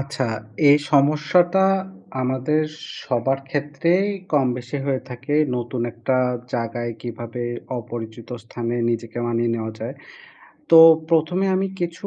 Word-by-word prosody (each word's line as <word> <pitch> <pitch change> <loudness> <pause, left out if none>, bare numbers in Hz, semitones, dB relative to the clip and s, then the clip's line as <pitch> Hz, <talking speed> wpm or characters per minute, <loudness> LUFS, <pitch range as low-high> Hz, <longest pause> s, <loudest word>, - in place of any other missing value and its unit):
আচ্ছা 135 -1 -3 0.4
এই 145 - +8
সমস্যাটা 155 +6 +3 0.6
আমাদের 130 +4 0 0.4
সবার 135 +1 0
ক্ষেত্রেই 150 +7 +1 0.3
কমবেশি 125 -2 0
হয়ে 135 -2 0
থাকে, 135 +4 -4 0.2
নতুন 120 0 -4
একটা 120 +3 -1 0.4
জায়গায় 120 0 -3
কিভাবে 120 0 -6 0.4
অপরিচিত 115 0 -8 0.2
স্থানে 120 0 -4 0.2
নিজেকে 115 0 -4
মানিয়ে 120 0 0
নেওয়া 110 0 -4
যায়? - - -5 0.8
তো 165 - +9 0.3
প্রথমে 165 +4 +2
এ 190 - +2
আমি 195 - 0
কিছু 170 +3 -3
130 Hz, 120 wpm, -22 LUFS, 120-150 Hz, 0.8 s, তো